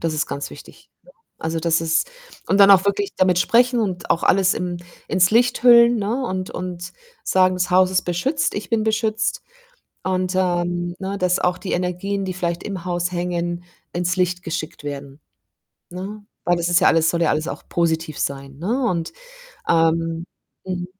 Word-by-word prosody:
das 165 -2 -1
ist 150 - 0
ganz 140 - -5
wichtig, - - -14
ne? - - -19 0.3
Also, 160 0 -2
das 165 0 +1
ist 165 - +1 0.4
und 195 - +2
dann 200 0 +8
auch 190 0 +7
wirklich 200 0 -1
damit 180 -1 +3
sprechen 245 +4 +3
und 185 -4 -3
auch 170 - +2
alles 190 0 +3
im 175 -1 -3 0.3
ins 185 -1 +3
Licht 245 0 +3
hüllen, 235 -1 +7
ne, 225 +6 -1
und 185 -4 -3
und 180 -1 -6 0.3
sagen: 185 0 +3
„Das 180 - 0
Haus 185 0 +4
ist 185 - +1
beschützt, 220 - -1
ich 205 - -5
bin 220 -1 +1
beschützt.“ 220 0 0 0.6
Und, 185 0 -1
ähm, 175 -1 0
ne, 195 +1 -4
dass 180 -1 +1
auch 180 0 0
die 190 - -6
Energien, 185 +3 -2
die 185 - -3
vielleicht 170 -1 -2
im 190 -4 -6
Haus 175 0 -1
hängen, 175 0 -2 0.3
ins 175 +1 -1
Licht 180 0 0
geschickt 165 -1 -5
werden, 140 -1 -7 0.7
ne? 200 +4 -7 0.2
Weil 175 0 +2
das 170 0 -1
ist 175 +1 +4
ja - - +4
alles 165 0 +4
soll 170 - -2
ja 165 - +3
alles 155 +2 -1
auch - - -6
positiv 160 -3 -1
sein, 135 0 -4
ne? 240 - -1
Und, 170 -4 -2 0.6
ähm 165 0 +1 0.4
mhm. 180 -1 -3
180 Hz, 185 wpm, -21 LUFS, 170-195 Hz, 0.7 s, dann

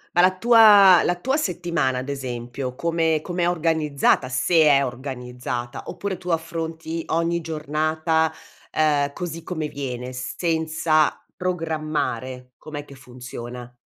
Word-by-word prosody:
Ma 175 - +6
la 185 0 +4
tua 210 -5 +7
la 175 - +1
tua 265 +11 -1
settimana 170 - -1
ad 130 +2 -4
esempio, 125 -1 -5
come 165 +1 +1
com'è 175 -1 0
organizzata? 155 -6 +1
Se 130 +7 -1
è 140 -3 +5
organizzata, 125 -1 -5
oppure 200 -2 -4
tu 180 - -7
affronti 165 0 -3
ogni 170 +1 0
giornata, 155 +1 0 0.4
ehm, 145 -2 +1
così 165 -2 -5
come 160 -3 -4
viene, 125 -2 -5
senza 155 +3 0 0.2
programmare, 155 -8 -3
com'è 145 -2 -7
che 140 - -13
funziona? 125 -1 -9
155 Hz, 120 wpm, -23 LUFS, 130-170 Hz, 0.4 s, tua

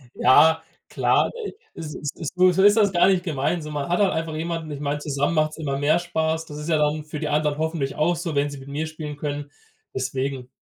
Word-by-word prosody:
Ja, 160 +5 +5 0.3
klar, - - +2
äh, - - -3
e - - -13 0.3
es 155 -2 -6
es 150 +1 -4
so 185 +1 +4
ist 205 +2 +6
das 205 -3 +4
gar 175 0 +4
nicht 190 -2 +3
gemeint, 155 0 -1
so. 150 - -7
Man 145 +1 -3
hat 175 - +1
halt 195 -2 +3
einfach 160 -1 -3
jemanden 165 -1 -3
ich 145 - -5
meine, 145 0 -2
zusammen 145 +2 -1
macht's 155 0 +1
immer 140 -4 -2
mehr 155 +4 +3
Spaß. 160 -1 -1
Das 150 -2 -9
ist 150 +2 -6
ja 160 - +3
dann 150 +1 +1
für 150 0 -7
die 150 - -2
anderen 150 0 +1
hoffentlich 155 -3 -2
auch 170 +3 +2
so, 165 -2 -4
wenn 145 +1 +1
sie 145 - -8
mit 135 +1 -11
mir 150 +3 -3
spielen 155 -2 -7
können. 145 -1 -4 0.4
Deswegen 130 0 -3
155 Hz, 235 wpm, -23 LUFS, 145-165 Hz, 0.4 s, ist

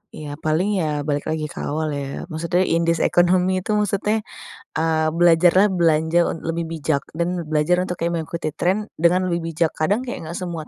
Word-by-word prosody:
Iya, 150 0 -7
paling 160 +5 0
ya 150 -3 -1
balik 145 -1 -2
lagi 155 -1 -2
ke - - -9
awal 155 +1 -2
ya. 140 -1 -4
Maksudnya 170 +3 0
indeks 170 -1 +1
ekonomi 180 +1 +3
itu 210 +3 -2
maksudnya 210 +1 0 0.5
eee, 160 -1 +1
belajarlah 175 +4 +5
belanja 165 -1 +2
unt 165 - -5
lebih 165 +1 -2
bijak 155 -3 -1 0.2
dan 170 0 -2
belajar 155 +3 +2
untuk 180 - -3
kayak 170 - +1
mengikuti 160 0 -4
trend 195 +7 -1
dengan 180 +2 +3
lebih 170 - 0
bijak. 165 0 0
Kadang 205 +10 +1
kayak 250 - -5
enggak 170 - -6
semua 170 -4 -5
170 Hz, 180 wpm, -21 LUFS, 155-180 Hz, 0.5 s, belajarlah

